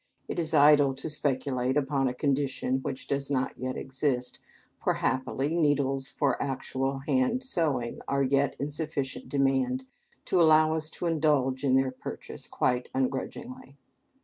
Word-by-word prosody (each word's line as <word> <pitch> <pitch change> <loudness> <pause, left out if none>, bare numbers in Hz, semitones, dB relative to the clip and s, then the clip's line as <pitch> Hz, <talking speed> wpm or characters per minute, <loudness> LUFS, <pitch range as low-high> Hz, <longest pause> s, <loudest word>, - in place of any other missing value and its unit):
It - - -3
is 160 -1 -1
idle 145 -2 +6
to 145 +4 -5
speculate 130 -2 0
upon 135 -1 +1
a 125 - -1
condition 135 -1 0
which 130 0 -5
does 140 0 -2
not 135 -2 -1
yet 130 0 -4
exist, 130 -2 -2 0.4
for, - - +2
happily, 130 +3 -1
needles 140 -4 +1
for 140 - 0
actual 135 0 -2
hand 135 - +1
sewing 150 - -1
are 140 0 +1
yet 140 +1 +2
in 145 +2 -2
sufficient 145 -3 -4
demand 135 -2 +1 0.4
to 180 - +2
allow 155 -1 +5
us 155 -1 -2
to 175 - -6
indulge 150 -5 +1
in 130 -2 +3
their 135 0 +2
purchase 130 - -8
quite 125 0 0
ungrudgingly. 140 - -3
135 Hz, 145 wpm, -28 LUFS, 130-150 Hz, 0.4 s, idle